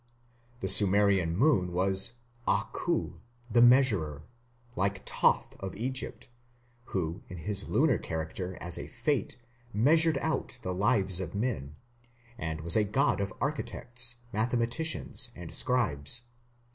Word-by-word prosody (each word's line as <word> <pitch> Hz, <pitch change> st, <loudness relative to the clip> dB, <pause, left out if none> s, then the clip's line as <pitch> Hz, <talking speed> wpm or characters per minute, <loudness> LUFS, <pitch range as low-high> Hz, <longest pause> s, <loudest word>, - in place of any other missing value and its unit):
The -, -, -1 dB
Sumerian 100 Hz, -4 st, +4 dB
moon 110 Hz, -, +3 dB
was 95 Hz, +5 st, +2 dB, 0.3 s
Aku, -, -, -1 dB, 0.3 s
"the 120 Hz, -, +4 dB
measurer", 110 Hz, -, +4 dB, 0.5 s
like 100 Hz, +1 st, -1 dB
Thoth -, -, +1 dB
of 95 Hz, -1 st, -6 dB
Egypt, 130 Hz, +4 st, -4 dB, 0.6 s
who 85 Hz, -5 st, -3 dB
in 90 Hz, -, -8 dB
his 100 Hz, +4 st, -1 dB
lunar 145 Hz, -4 st, +3 dB
character 85 Hz, +3 st, -5 dB
as 85 Hz, 0 st, +2 dB
a -, -, -6 dB
Fate 130 Hz, +2 st, -2 dB, 0.3 s
measured 155 Hz, +8 st, +4 dB
out 155 Hz, -3 st, -2 dB
the 90 Hz, -, -2 dB
lives 95 Hz, -2 st, +2 dB
of 95 Hz, -, -5 dB
men, 100 Hz, -, -3 dB, 0.6 s
and 80 Hz, -5 st, -4 dB
was 85 Hz, +1 st, +1 dB
a 110 Hz, -, +4 dB
god 100 Hz, 0 st, +1 dB
of 100 Hz, 0 st, -2 dB
architects, 125 Hz, -4 st, -2 dB, 0.2 s
mathematicians, 120 Hz, +4 st, -1 dB
and 85 Hz, -1 st, -9 dB
scribes. 120 Hz, -, +1 dB
100 Hz, 120 wpm, -29 LUFS, 90-125 Hz, 0.6 s, Sumerian